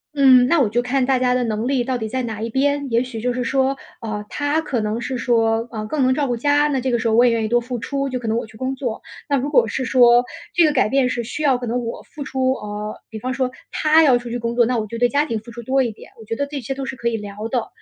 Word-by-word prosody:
嗯， 260 Hz, -3 st, +6 dB
那 335 Hz, +2 st, +3 dB
我 255 Hz, -, +3 dB
就 240 Hz, +3 st, +1 dB
看 250 Hz, +1 st, 0 dB
大 265 Hz, -1 st, +2 dB
家 250 Hz, 0 st, +2 dB
的 250 Hz, -, +1 dB
能 220 Hz, 0 st, -2 dB
力 265 Hz, -2 st, +1 dB
到 260 Hz, 0 st, -2 dB
底 220 Hz, -2 st, -4 dB
在 260 Hz, +1 st, -2 dB
哪 220 Hz, -2 st, -5 dB
一 230 Hz, -, -2 dB
边。 285 Hz, +2 st, 0 dB
也 235 Hz, +1 st, +2 dB
许 240 Hz, -4 st, -7 dB
就 250 Hz, -, 0 dB
是 250 Hz, 0 st, -2 dB
说， 270 Hz, +2 st, +1 dB, 0.2 s
呃， 215 Hz, -2 st, -4 dB
他 290 Hz, +2 st, 0 dB
可 275 Hz, -7 st, -2 dB
能 215 Hz, +2 st, -2 dB
是 255 Hz, +1 st, -4 dB
说， 230 Hz, -1 st, +1 dB
呃， 215 Hz, -2 st, -4 dB
更 295 Hz, +6 st, -2 dB
能 260 Hz, 0 st, +3 dB
照 290 Hz, -, 0 dB
顾 245 Hz, -, 0 dB
家， 290 Hz, +4 st, +2 dB
那 275 Hz, -3 st, 0 dB
这 260 Hz, -, -1 dB
个 240 Hz, -, +2 dB
时 230 Hz, -, -1 dB
候 220 Hz, -, +2 dB
我 235 Hz, +2 st, +6 dB
也 245 Hz, -, +4 dB
愿 225 Hz, -1 st, 0 dB
意 -, -, -1 dB
多 240 Hz, +2 st, +2 dB
付 245 Hz, +1 st, -5 dB
出， 275 Hz, +4 st, -2 dB
就 255 Hz, -, -2 dB
可 240 Hz, -2 st, -6 dB
能 220 Hz, -, +1 dB
我 230 Hz, -, -2 dB
去 220 Hz, -, -15 dB
工 260 Hz, +2 st, -2 dB
作。 250 Hz, -4 st, -4 dB, 0.3 s
那 280 Hz, -, +3 dB
如 280 Hz, +3 st, -2 dB
果 485 Hz, -, +4 dB
是 260 Hz, -, -2 dB
说 245 Hz, -1 st, +5 dB, 0.3 s
这 345 Hz, -, +6 dB
个 305 Hz, -, +3 dB
改 255 Hz, -6 st, +2 dB
变 265 Hz, 0 st, +2 dB
是 240 Hz, -2 st, -2 dB
需 290 Hz, +7 st, -5 dB
要 265 Hz, -4 st, +3 dB
可 245 Hz, -, -5 dB
能 240 Hz, +2 st, 0 dB
我 230 Hz, -, -5 dB
付 290 Hz, -, -9 dB
出 260 Hz, -1 st, 0 dB
呃， 210 Hz, -2 st, -6 dB
比 220 Hz, -, -7 dB
方 255 Hz, +4 st, -3 dB
说 260 Hz, -2 st, -1 dB, 0.2 s
他 315 Hz, +1 st, +4 dB
要 265 Hz, -5 st, +5 dB
出 240 Hz, -1 st, -7 dB
去 245 Hz, -, -2 dB
工 235 Hz, 0 st, -3 dB
作， 240 Hz, -1 st, +4 dB
那 245 Hz, 0 st, 0 dB
我 215 Hz, -, -3 dB
就 230 Hz, -, -6 dB
对 245 Hz, 0 st, +3 dB
家 290 Hz, +1 st, +2 dB
庭 230 Hz, -7 st, -2 dB
付 230 Hz, +2 st, -13 dB
出 235 Hz, 0 st, -8 dB
多 265 Hz, +3 st, +1 dB
一 235 Hz, -, -2 dB
点， 210 Hz, -, -14 dB
我 220 Hz, -, -12 dB
觉 225 Hz, -, -3 dB
得 285 Hz, +3 st, -2 dB
这 285 Hz, -1 st, -5 dB
些 270 Hz, +2 st, -4 dB
都 270 Hz, 0 st, -5 dB
是 270 Hz, -, -4 dB
可 235 Hz, -2 st, -3 dB
以 235 Hz, -, +1 dB
聊 210 Hz, 0 st, -6 dB
的。 240 Hz, -2 st, -1 dB
250 Hz, 340 characters per minute, -21 LUFS, 230-270 Hz, 0.3 s, 嗯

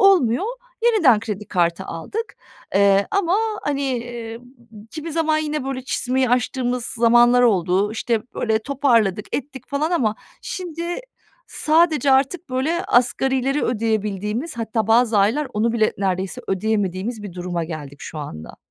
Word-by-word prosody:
olmuyor, 360 Hz, -, +4 dB, 0.4 s
yeniden 355 Hz, -, +5 dB
kredi 210 Hz, -2 st, -5 dB
kartı 175 Hz, 0 st, 0 dB
aldık, 410 Hz, -, -5 dB, 0.4 s
eee, 200 Hz, 0 st, +4 dB
ama 385 Hz, -2 st, +2 dB, 0.3 s
hani, 285 Hz, -1 st, -1 dB, 0.2 s
eee, 235 Hz, -1 st, -7 dB, 0.5 s
kimi 320 Hz, 0 st, -6 dB
zaman 315 Hz, -1 st, +1 dB
yine 305 Hz, -2 st, -2 dB
böyle 265 Hz, -1 st, -3 dB
çizmeyi 260 Hz, 0 st, 0 dB
açtığımız 250 Hz, 0 st, 0 dB
zamanlar 240 Hz, +1 st, +4 dB
oldu. 195 Hz, -2 st, +2 dB
İşte, 225 Hz, 0 st, -1 dB
böyle 220 Hz, -1 st, +1 dB
toparladık 230 Hz, -6 st, +1 dB
ettik, 265 Hz, -2 st, -8 dB
falan 290 Hz, +3 st, -1 dB
ama 235 Hz, -12 st, +1 dB, 0.3 s
şimdi 340 Hz, -3 st, -5 dB, 0.6 s
sadece 310 Hz, -3 st, +2 dB
artık 275 Hz, +5 st, +1 dB
böyle 300 Hz, +7 st, 0 dB
asgarileri 265 Hz, +3 st, +2 dB
ödeyebildiğimiz 220 Hz, -, -2 dB
hatta 225 Hz, -1 st, -1 dB
bazı 225 Hz, -1 st, +4 dB
aylar 230 Hz, +10 st, +2 dB
onu 225 Hz, +2 st, +1 dB
bile 220 Hz, -2 st, +2 dB
neredeyse 190 Hz, -1 st, -2 dB
ödeyemediğimiz 205 Hz, +2 st, -1 dB
bir 205 Hz, -3 st, -7 dB
duruma 175 Hz, -2 st, -3 dB
geldik, 150 Hz, -4 st, -7 dB
şu 160 Hz, -, -7 dB
anda. 80 Hz, -, -8 dB
235 Hz, 130 wpm, -21 LUFS, 210-280 Hz, 0.6 s, yeniden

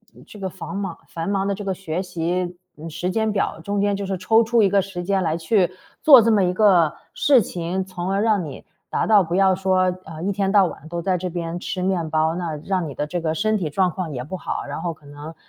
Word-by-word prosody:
呃， -, -, -16 dB
这 210 Hz, -, -13 dB
个 190 Hz, -1 st, -3 dB
房 190 Hz, +2 st, -8 dB
莽 195 Hz, -4 st, -4 dB
繁 165 Hz, +2 st, -4 dB
忙 195 Hz, -1 st, 0 dB
的 200 Hz, -, 0 dB
这 205 Hz, +1 st, -6 dB
个 190 Hz, -, 0 dB
学 180 Hz, -2 st, -4 dB
习， 180 Hz, 0 st, -2 dB, 0.2 s
嗯， 160 Hz, +2 st, -7 dB
时 175 Hz, +3 st, -3 dB
间 220 Hz, +1 st, 0 dB
表， 200 Hz, -5 st, -1 dB
中 200 Hz, +3 st, -1 dB
间 205 Hz, 0 st, +1 dB
就 200 Hz, -, -4 dB
是 190 Hz, 0 st, -2 dB
抽 220 Hz, +5 st, +4 dB
出 230 Hz, 0 st, +3 dB
一 195 Hz, -, +4 dB
个 200 Hz, 0 st, +3 dB
时 185 Hz, -2 st, -6 dB
间 195 Hz, +1 st, +1 dB
来 160 Hz, -3 st, 0 dB
去 175 Hz, +3 st, +2 dB, 0.3 s
做 280 Hz, -7 st, +9 dB
这 225 Hz, +1 st, +3 dB
么 210 Hz, -, +4 dB
一 180 Hz, -, 0 dB
个 180 Hz, -6 st, +4 dB, 0.2 s
事 275 Hz, -4 st, +4 dB
情。 180 Hz, 0 st, -3 dB
从 185 Hz, 0 st, -4 dB
而 195 Hz, +1 st, +1 dB
让 215 Hz, -4 st, +2 dB
你 150 Hz, -4 st, -8 dB, 0.2 s
达 -, -, 0 dB
到 215 Hz, -2 st, +6 dB
不 170 Hz, 0 st, -3 dB
要 190 Hz, 0 st, +4 dB
说， 185 Hz, -1 st, +2 dB
呃， 160 Hz, 0 st, -8 dB
一 200 Hz, -, 0 dB
天 195 Hz, 0 st, 0 dB
到 200 Hz, -2 st, +5 dB
晚 160 Hz, -3 st, -7 dB
都 170 Hz, 0 st, -3 dB
在 185 Hz, +2 st, 0 dB
这 180 Hz, +1 st, -3 dB
边 170 Hz, 0 st, -4 dB
吃 185 Hz, 0 st, -4 dB
面 180 Hz, -4 st, 0 dB
包， 160 Hz, 0 st, +1 dB
那 170 Hz, -3 st, -3 dB
让 185 Hz, -4 st, 0 dB
你 140 Hz, -, -8 dB
的 150 Hz, -, -2 dB
这 175 Hz, +3 st, -3 dB
个 160 Hz, -1 st, -1 dB
身 215 Hz, +4 st, +1 dB
体 180 Hz, -7 st, -1 dB
状 180 Hz, +4 st, +1 dB
况 170 Hz, -1 st, -4 dB
也 125 Hz, -3 st, -4 dB
不 155 Hz, +8 st, -6 dB
好， 185 Hz, -, -4 dB
然 -, -, -5 dB
后 175 Hz, -, -2 dB
可 150 Hz, -, -23 dB
能， 145 Hz, +2 st, -9 dB
嗯 165 Hz, -, -11 dB
185 Hz, 285 characters per minute, -22 LUFS, 165-200 Hz, 0.3 s, 做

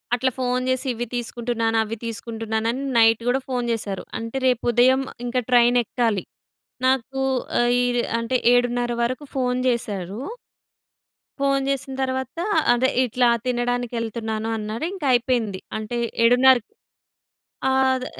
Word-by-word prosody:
అట్లా 260 Hz, +2 st, 0 dB
ఫోన్ 250 Hz, 0 st, 0 dB
జేసి, 260 Hz, +1 st, 0 dB
ఇవి 240 Hz, +1 st, -3 dB
తీసుకుంటున్నాను, 235 Hz, -1 st, -1 dB
అవి 220 Hz, +1 st, -5 dB
తీసుకుంటున్నాను 225 Hz, -1 st, -3 dB
అని 265 Hz, +3 st, -4 dB
నైట్ 225 Hz, 0 st, +5 dB
గూడ 250 Hz, +2 st, +3 dB
ఫోన్ 245 Hz, -2 st, -1 dB
జేసారు. 205 Hz, -4 st, -3 dB, 0.2 s
అంటే, 230 Hz, +3 st, -5 dB
రేపు 250 Hz, -2 st, +1 dB
ఉదయం 255 Hz, +3 st, +4 dB, 0.2 s
ఇంక, 245 Hz, +1 st, -5 dB, 0.2 s
ట్రైన్ 245 Hz, 0 st, +5 dB
ఎక్కాలి. 225 Hz, -4 st, -1 dB, 0.6 s
నాకూ 265 Hz, +1 st, +1 dB, 0.4 s
ఆహ్, 240 Hz, 0 st, +3 dB
ఈర్ 245 Hz, -1 st, +1 dB, 0.2 s
అంటే 230 Hz, +2 st, 0 dB, 0.2 s
7:30 245 Hz, 0 st, +1 dB
వరకు 255 Hz, +5 st, -2 dB
ఫోన్ 250 Hz, -1 st, 0 dB
జేసారు... 205 Hz, -5 st, -2 dB, 1.2 s
ఫోన్ 275 Hz, -1 st, +1 dB
జేసిన 275 Hz, -1 st, -2 dB
తరువాత, 260 Hz, +3 st, -3 dB, 0.3 s
అదే 255 Hz, +2 st, +2 dB
ఇట్లా 245 Hz, 0 st, +2 dB, 0.2 s
"తినడానికి 245 Hz, -1 st, -1 dB
ఎళ్తున్నాను" 220 Hz, -1 st, -3 dB
అన్నారు. 215 Hz, +6 st, -4 dB
ఇంకా 370 Hz, -7 st, -5 dB
అయిపోయింది. 235 Hz, -5 st, 0 dB, 0.2 s
అంటే, 220 Hz, +2 st, -4 dB, 0.3 s
ఏడున్నర్ 250 Hz, +2 st, +6 dB, 1.2 s
ఆద్ 260 Hz, -1 st, +2 dB
245 Hz, 130 wpm, -23 LUFS, 225-255 Hz, 1.2 s, ఏడున్నర్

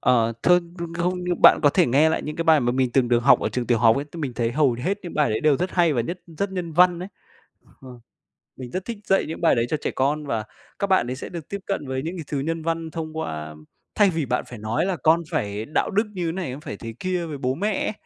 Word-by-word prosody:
Ờ, 115 Hz, -2 st, +3 dB
th -, -, +1 dB
ơ, 180 Hz, -, +7 dB, 0.4 s
không, 180 Hz, +1 st, 0 dB
nhưng 180 Hz, -1 st, -2 dB
bạn -, -, +8 dB
có 145 Hz, -, +6 dB
thể 180 Hz, +1 st, +3 dB
nghe 140 Hz, +6 st, +4 dB
lại 160 Hz, -, -1 dB
những 150 Hz, -, -5 dB
cái 165 Hz, -, -2 dB
bài 160 Hz, -3 st, +5 dB
mà 120 Hz, 0 st, +1 dB
mình 130 Hz, -1 st, 0 dB
từng 130 Hz, -3 st, +2 dB
được 120 Hz, 0 st, +4 dB
học -, -, +6 dB
ở -, -, 0 dB
trường 125 Hz, -1 st, -3 dB
tiểu 120 Hz, -2 st, +2 dB
học 115 Hz, 0 st, +5 dB
ấy, 140 Hz, -, -2 dB
thì 170 Hz, -, -8 dB
mình 135 Hz, -4 st, -3 dB
thấy 115 Hz, -1 st, -1 dB
hầu 140 Hz, -1 st, +3 dB
hết 180 Hz, -, -2 dB
những 175 Hz, -, -8 dB
bài 150 Hz, -, +2 dB
đấy 110 Hz, -, -1 dB
đều 150 Hz, -3 st, +3 dB
rất 180 Hz, +1 st, -2 dB
hay 170 Hz, -3 st, +3 dB
và 120 Hz, -, +1 dB
nhất 170 Hz, +10 st, -4 dB
rất 170 Hz, +5 st, -4 dB
nhân 175 Hz, -3 st, -4 dB
văn 180 Hz, +1 st, +4 dB
ấy. 185 Hz, -, -6 dB, 0.7 s
Ờ. 125 Hz, -2 st, -11 dB, 0.6 s
Mình 125 Hz, -2 st, -8 dB
rất 185 Hz, +1 st, -4 dB
thích 235 Hz, -2 st, -5 dB
dạy 195 Hz, -, +2 dB
những 160 Hz, -, -6 dB
bài 170 Hz, -, +4 dB
đấy 115 Hz, 0 st, +1 dB
cho 155 Hz, -, 0 dB
trẻ -, -, -2 dB
con 145 Hz, +3 st, 0 dB
và 115 Hz, -6 st, -2 dB, 0.4 s
các 200 Hz, -, 0 dB
bạn 190 Hz, -10 st, +3 dB
ấy 125 Hz, -, -3 dB
sẽ -, -, -7 dB
được 170 Hz, -4 st, -7 dB
tiếp 200 Hz, -, -3 dB
cận 175 Hz, -8 st, -2 dB
với 130 Hz, 0 st, -2 dB
những 170 Hz, +3 st, -4 dB
cái 165 Hz, -, -5 dB
thứ 145 Hz, -, -2 dB
nhân 165 Hz, +4 st, -2 dB
văn 165 Hz, -1 st, -2 dB
thông 160 Hz, -1 st, -6 dB
qua 80 Hz, -, -5 dB, 0.4 s
thay 205 Hz, -2 st, +5 dB
vì 160 Hz, -4 st, -1 dB
bạn 125 Hz, 0 st, -1 dB
phải 120 Hz, -4 st, -9 dB
nói 110 Hz, -, -1 dB
là 190 Hz, -2 st, 0 dB
con 165 Hz, +2 st, +3 dB
phải 105 Hz, +1 st, -2 dB
đạo 155 Hz, -, 0 dB
đức 210 Hz, +2 st, +2 dB
như 180 Hz, -2 st, -3 dB
thế 165 Hz, -, 0 dB
này, 180 Hz, -7 st, -4 dB
con 135 Hz, -, -8 dB
phải 105 Hz, -, -7 dB
thế 115 Hz, +1 st, -7 dB
kia 180 Hz, -2 st, -2 dB
với 150 Hz, -3 st, -6 dB
bố 130 Hz, -1 st, -1 dB
mẹ 205 Hz, +5 st, -1 dB
ấy, -, -, -1 dB
155 Hz, 290 wpm, -23 LUFS, 125-175 Hz, 0.7 s, bạn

